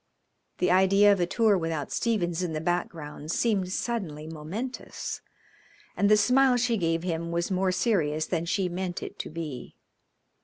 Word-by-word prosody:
The 180 - +2
idea 195 +2 +5
of 195 - -2
a 175 - +1
tour 220 +1 +3
without 165 -3 -3
Stephens 185 -7 0
in 175 -3 -2
the 155 - -2
background 160 -3 -3
seemed 195 -4 +1
suddenly 185 -10 -3
momentous, 165 +12 -6 0.7
and 200 - +2
the 215 - +6
smile 250 +4 +4
she 240 -1 +1
gave 165 -4 0
him 170 -1 -2
was 170 +2 -1
more 185 0 +1
serious 160 -7 +1
than 170 -1 -2
she 185 +2 0
meant 180 0 -4
it - - -8
to - - -4
be. 155 -5 -6
180 Hz, 160 wpm, -27 LUFS, 165-205 Hz, 0.7 s, the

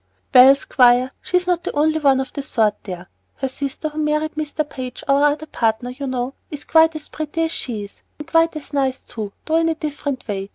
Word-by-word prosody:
"Well, 260 +1 +9
Squire, 250 -1 +3
she's 360 0 0
not 355 -2 0
the - - -3
only 310 +2 +2
one 275 -3 +4
of 265 - -4
the 285 - -3
sort 220 -6 +1
over - - -39
there. 180 -2 -7 0.3
Her 265 - -2
sister, 280 +3 -4
who 300 +1 -7
married 305 0 0
Mr. 305 0 -3
Page, 255 -3 -7
our 280 +1 +4
other 295 +1 +1
partner, 230 -3 -1
you 275 +2 -6
know, 255 0 -2 0.2
is 295 -2 -8
quite 320 0 +4
as 310 - -7
pretty 310 +2 -3
as 325 - -1
she 225 -9 -4
is, 200 - -17 0.2
and 330 +2 +1
as 300 -1 -9
nice, 265 -2 0
too, 215 -3 -7
though 320 +1 +2
in 330 0 +2
a 325 - 0
different 285 -4 -4
way. 195 -2 -4
280 Hz, 220 wpm, -20 LUFS, 250-310 Hz, 0.3 s, Well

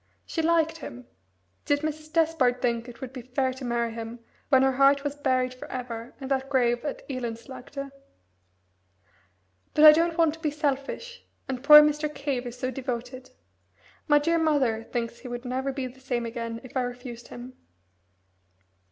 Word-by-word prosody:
She 325 - -2
liked 325 0 +2
him 125 - -9 0.6
did 290 0 +1
Mrs. 310 0 -4
Despard 315 -7 +2
think 235 -1 -1
it 235 - -13
would 260 -1 -7
be 255 - -6
fair 260 +2 -1
to 260 +1 -10
marry 235 -1 -1
him 230 +1 -6 0.3
when 265 -2 +5
her 265 - +4
heart 275 +1 +4
was 290 -1 -2
buried 255 -3 0
for 255 - -11
ever 245 -2 -6
in 270 - -6
that 270 0 0
grave 240 -3 +2
at 290 - -5
Elendslaagte? 255 +2 -6 1.8
"But 305 - +7
I 305 - +13
don't 335 +2 +1
want 325 -3 +4
to 325 - -12
be 315 -2 0
selfish, 295 - -3 0.2
and 260 -1 -4
poor 300 +1 +11
Mr. 300 0 0
Cave 275 -4 -3
is 240 +1 -8
so 255 +1 -2
devoted. 255 0 -5 0.8
My 295 - +6
dear 330 +3 +2
mother 270 -8 +1
thinks 235 0 -4
he 250 - -9
would 245 +1 -6
never 260 +2 -2
be 265 -1 -4
the 255 +1 -9
same 245 -3 -2
again 230 0 -5
if 255 - -13
I 260 - +2
refused 245 -1 -6
him." 245 +1 -9
260 Hz, 175 wpm, -27 LUFS, 245-290 Hz, 1.8 s, I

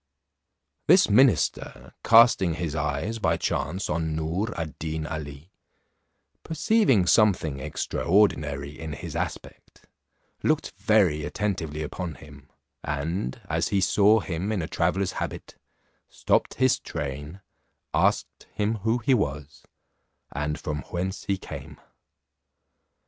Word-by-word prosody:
This 180 - +6
minister 125 +1 +2
casting 115 -7 +6
his 80 -3 -3
eyes 75 +9 -2
by - - +1
chance 95 +1 -2
on 80 0 -1
Noor 85 +8 -2
ad 80 -3 -5
Deen 80 0 -3
Ali, 75 +1 -7 0.9
perceiving 160 - +2
something 90 -9 +3
extraordinary 75 -1 0
in 80 +1 -7
his 70 - -7
aspect, - - -6 0.6
looked - - 0
very 95 -9 +2
attentively 80 -3 -3
upon 85 +2 -5
him, 70 -3 -15 0.3
and 75 -1 -3
as - - 0
he 100 - +1
saw 105 +3 +4
him 95 +3 -3
in 100 -6 -1
a - - -4
traveller's 90 +4 0
habit, - - -6 0.5
stopped - - 0
his 130 -1 +3
train, 75 +4 -6 0.5
asked - - 0
him 105 +2 0
who 110 +4 0
he 125 +3 +2
was, 75 - -2 0.7
and 75 +1 -3
from 75 -2 -3
whence 95 +3 -3
he 100 - 0
came? - - -9
85 Hz, 115 wpm, -26 LUFS, 75-105 Hz, 0.9 s, This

